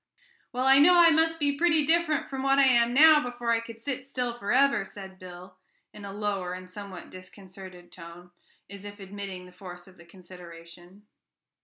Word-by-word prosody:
"Well, 255 +1 -2
I 270 +1 +6
know 355 +5 +6
I 340 -1 +6
must 325 +1 +1
be 285 -2 -1
pretty 320 -1 +2
different 325 -2 0
from 270 -1 -6
what 270 0 +2
I 280 - +5
am 240 -2 +3
now 305 +3 +6
before 245 -2 -4
I 230 - +2
could 230 0 -11
sit 260 +2 -5
still 250 -3 -4
forever," 245 +2 +1
said 190 -1 -12
Bill 185 0 -12 0.4
in 205 -1 -11
a 200 - -8
lower 200 -3 -4
and 185 0 -9
somewhat 190 -1 -10
disconcerted 185 -1 -13
tone, 175 +1 -13 0.4
as 200 0 -11
if 205 0 -11
admitting 195 -2 -8
the 180 - -15
force 180 -1 -12
of 185 - -19
the 170 - -17
consideration. 175 +1 -15
205 Hz, 185 wpm, -26 LUFS, 185-270 Hz, 0.4 s, I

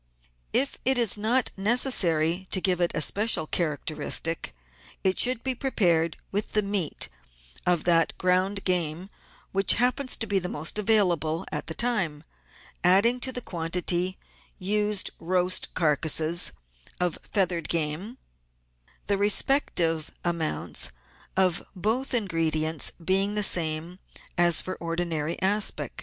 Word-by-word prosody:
If 275 +1 +1
it 265 0 +4
is 235 -4 +4
not 225 +4 +1
necessary 190 - +2
to 190 - +1
give 180 -2 0
it 175 - +1
a 155 - +3
special 210 -3 +2
characteristic, 155 - -2 0.5
it 190 0 +1
should 250 -1 +2
be 265 - 0
prepared 175 - 0
with 205 +2 -2
the 210 - +1
meat 200 -6 -2 0.6
of 175 -3 +2
that 165 -2 +2
ground 185 +2 0
game 180 +1 -1 0.4
which 195 0 +2
happens 250 +3 +1
to 225 - -3
be 200 -2 0
most 175 +2 -4
available 180 -6 +1
at 150 +1 -4
the 160 - -4
time, 190 -12 0 0.6
adding 200 +8 +4
to 260 - -1
the 250 - -4
quantity 175 +1 -2 0.4
used 210 +1 0
roast 180 +1 -1
carcases 160 +1 +3 0.5
of 180 -2 -1
feathered 180 -4 -1
game, 170 +9 -1 0.9
the 200 -1 -1
respective 180 - +2 0.2
amounts 170 -3 -1 0.5
of 185 -2 +2
both 225 +8 -1
ingredients 160 - +1
being 195 +3 +2
the 210 - +3
same 165 0 0 0.4
as 175 -2 +4
for 185 - -5
ordinary 165 -2 -3
aspic. 205 +2 +1
185 Hz, 125 wpm, -25 LUFS, 165-210 Hz, 0.9 s, it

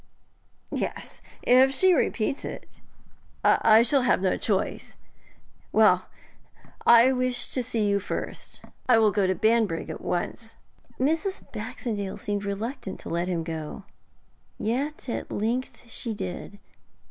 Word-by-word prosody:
'Yes, - - -4 0.2
if 260 +2 +6
she 370 +7 +4
repeats 255 -5 0
it. - - -9 0.6
I 220 +1 +6
shall 270 +3 +3
have 250 - +3
no 185 -1 +1
choice. 200 -4 -2 0.8
Well, - - +4 0.8
I 235 +2 +8
wished 255 -1 -1
to 255 - 0
see 230 -3 -1
you 200 0 +2
first; 200 - -6 0.3
I 245 - +7
will 220 -2 +4
go 200 -1 +1
to 185 - +1
Banbrigg 220 -7 +1
at - - -7
once.' 225 +6 -3 0.4
Mrs. 325 +9 0
Baxendale 215 -3 -4
seemed 205 -1 -3
reluctant 200 +1 -4
to - - -7
let 170 +1 -1
him 170 -3 -1
go, 160 +2 -6 0.7
yet 270 +7 -2
at 240 - -4
length 235 +5 -2
she 230 -1 -3
did. 190 +1 -6
225 Hz, 130 wpm, -26 LUFS, 200-255 Hz, 0.8 s, I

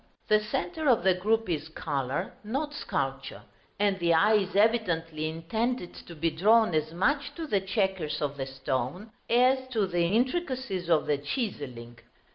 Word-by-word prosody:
the 215 - +6
centre 305 +8 -2
of 235 -7 +4
the 190 0 +5
group 220 +4 0
is 155 -3 -2
color, 145 -1 -3
not 275 +8 -3
sculpture, - - -3 0.3
and 200 -1 +1
the 170 -1 +3
eye 210 +7 +5
is 200 -2 +1
evidently 165 -8 +1
intended 200 +6 -2
to 170 - -11
be 165 +1 0
drawn 215 +5 +4
as 155 0 0
much 275 - 0
to 330 - -4
the 205 -10 +1
chequers 190 -5 -1
of 145 -1 -2
the 135 -1 -4
stone, 135 - -3 0.2
as 255 +2 +3
to 225 -6 0
the 175 -2 0
intricacies 250 - -1
of 160 -2 +3
the 145 -2 0
chiselling. 140 - -5
190 Hz, 160 wpm, -28 LUFS, 160-230 Hz, 0.3 s, the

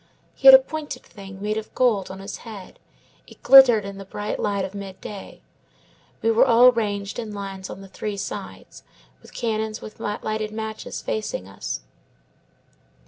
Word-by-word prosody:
He - - +1
had - - +13
a - - +12
pointed 310 - -6
thing, 195 -3 -12
made 210 +1 -1
of 220 - -11
gold, 220 -7 +2
on 190 - -7
his 195 +2 -7
head; 210 -5 -11 0.5
it - - -17
glittered 245 -6 +8
in 200 0 -7
the - - -7
bright 205 +2 -5
light 200 -2 -1
of 190 - -8
midday. 200 0 -9 0.8
We 225 - +3
were 225 - +5
all 250 0 +7
ranged 205 -3 -3
in 215 -3 -6
lines 195 -1 -6
on 195 - -8
the 195 - -11
three 205 +1 -5
sides, 200 - -7 0.4
with - - -16
cannons 220 -2 -2
with 215 - -11
lighted 215 +1 -3
matches 220 0 -6
facing 215 - -3
us. 95 -8 -5
210 Hz, 165 wpm, -23 LUFS, 195-225 Hz, 0.8 s, had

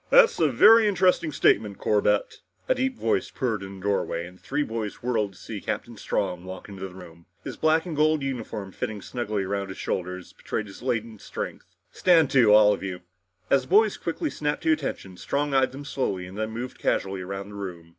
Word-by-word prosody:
"That's - - +6
a 160 - +4
very 220 - +7
interesting 180 -4 +2
statement, 105 -7 +2
Corbett!" 105 -1 +1 0.3
A - - +4
deep 260 -1 -1
voice 110 -4 0
purred 115 -6 -2
from 95 0 -8
the - - -13
doorway 100 -4 -1
and 90 +1 -13
the - - -31
three 145 +2 -1
boys 110 -4 -5
whirled 110 -5 0
to - - -18
see 105 -3 -7
Captain 120 - -4
Strong 90 -4 -2
walk 95 0 -8
into 95 -1 -7
the 90 - -14
room, 85 -2 -13 0.2
his - - -6
black 160 +1 +2
and 170 -4 -4
gold 155 0 +2
uniform 115 -7 -4
fitting 105 +1 -5
snugly 110 -5 -2
across 100 +1 -2
the 95 - -7
shoulders 90 0 -4
betraying 110 - -4
their 105 +5 -10
latent 110 -3 -2
strength. - - -7 0.2
"Stand 165 -6 +4
to 125 -6 +5
all 105 0 +7
of - - -5
you!" 95 -2 -5 0.5
As 135 - +5
the 130 - -13
boys 210 +3 +4
quickly 290 - -3
snapped 145 0 -2
to 160 - +3
attention, 100 - -4
Strong 145 +6 -1
eyed 135 -1 +3
them 140 +2 -9
slowly 95 -10 -2
and 95 +1 -10
then 110 +1 -2
moved 120 +3 -6
casually 95 -1 0
around 100 +2 -6
the - - -11
room. 90 -5 -7
110 Hz, 210 wpm, -26 LUFS, 95-145 Hz, 0.5 s, very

